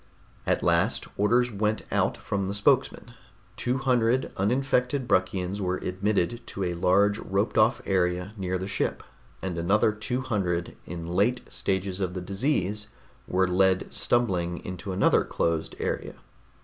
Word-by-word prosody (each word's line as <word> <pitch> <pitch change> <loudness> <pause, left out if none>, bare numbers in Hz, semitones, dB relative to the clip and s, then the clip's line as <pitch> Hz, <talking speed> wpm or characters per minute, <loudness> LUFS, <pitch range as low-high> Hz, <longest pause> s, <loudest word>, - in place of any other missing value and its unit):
At - - +1
last, 85 +6 +2
orders 120 +4 +2
went 105 +1 0
out - - +1
from 100 -1 -2
the 100 - -3
spokesman. 100 - +1 0.4
Two 125 +1 0
hundred 130 -1 +2
uninfected 125 +4 +1
Bruckians 95 0 0
were 90 -1 0
admitted 100 +4 -1
to 100 - -4
a 90 -1 -1
large 100 +4 +3
roped 100 +3 -1
off 110 +3 +3
area 90 +1 0
near 95 -2 -2
the 95 +1 -4
ship, 95 - -1 0.4
and 90 -3 -2
another 100 +6 +3
two 110 +4 -3
hundred 95 -9 -1
in 85 -1 -6
late 100 +9 +1
stages 95 0 -2
of 90 -1 -2
the - - -2
disease 105 0 -1 0.4
were 95 +1 +2
led 95 +1 +2
stumbling 90 -8 0
into 95 +2 -5
another 95 - +3
closed 85 -1 -1
area. - - -3
100 Hz, 145 wpm, -27 LUFS, 90-110 Hz, 0.4 s, large